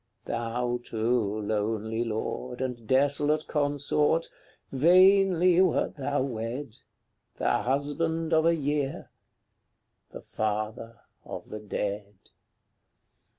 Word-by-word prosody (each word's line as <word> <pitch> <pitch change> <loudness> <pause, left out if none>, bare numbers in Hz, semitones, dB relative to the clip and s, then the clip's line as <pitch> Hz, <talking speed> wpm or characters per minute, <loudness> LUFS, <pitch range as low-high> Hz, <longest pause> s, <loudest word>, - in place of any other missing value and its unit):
Thou, 120 +1 -2
too, 110 -2 -1
lonely 110 +2 -1
lord, 120 +2 -4
And 125 -3 -4
desolate 145 +4 +2
consort 150 +2 +1 0.4
vainly 185 +3 +5
wert 185 -3 +1
thou 140 0 -1
wed! 120 0 -5 0.6
The - - +1
husband 160 +5 -1
of 160 +1 +4
a 170 - +4
year! 145 -2 -2 1.0
the - - -10
father 110 +1 -3 0.2
of - - -8
the 110 - -6
dead! 105 -1 -4
130 Hz, 95 wpm, -27 LUFS, 110-150 Hz, 1.0 s, vainly